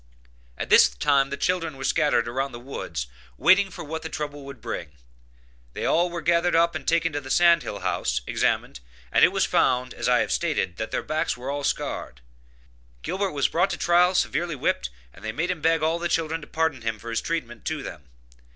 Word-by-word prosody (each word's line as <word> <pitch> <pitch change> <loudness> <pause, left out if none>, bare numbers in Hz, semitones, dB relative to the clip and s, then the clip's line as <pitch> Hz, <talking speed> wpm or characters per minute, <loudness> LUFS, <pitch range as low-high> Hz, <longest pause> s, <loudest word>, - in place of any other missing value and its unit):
At - - -5
this - - +8
time 135 - +2
the 140 - -4
children 165 -5 -1
were 135 - -7
scattered 145 -5 +2
around 135 +3 -1
in - - -16
the 120 - -7
woods, 85 - -5 0.3
waiting 195 - +5
for 180 - -8
what 160 +1 -5
the 160 - -6
trouble 145 -2 -5
would 140 -3 -9
bring; 80 -8 -6 0.8
They - - -4
all 175 +2 +3
were 170 -1 -5
gathered 170 +2 +2
up 170 +1 +4
and 150 -4 -6
taken 165 -1 +2
to 145 - -2
the 135 - -10
sand 170 +1 +5
hill 100 - -6
house, - - -1
examined, - - 0 0.3
and - - +4
it - - +10
was - - +1
found, 125 0 +1
as - - -2
I 125 -1 +4
have - - -2
stated, 145 - -1
that 110 +2 -3
their - - -2
backs 155 -5 -1
were 130 +3 -4
all 145 0 -3
scarred. 65 - -3 0.8
Gilbert 195 -1 -2
was 140 -2 +2
brought 170 - +1
to - - -3
trial, 175 +2 +3
severely 170 -2 0
whipped, 60 - -1 0.2
and - - -16
they 110 - -2
made 165 +9 -1
him 175 -4 -5
beg 165 0 +2
all 165 +2 +1
the 175 0 -2
children 165 -1 -1
to 150 - -11
pardon 160 -5 -1
him 115 -1 -2
for 115 +2 -8
his 115 - 0
treatment 120 -9 -4
to - - -2
them. 70 - -9
150 Hz, 220 wpm, -25 LUFS, 125-170 Hz, 0.8 s, it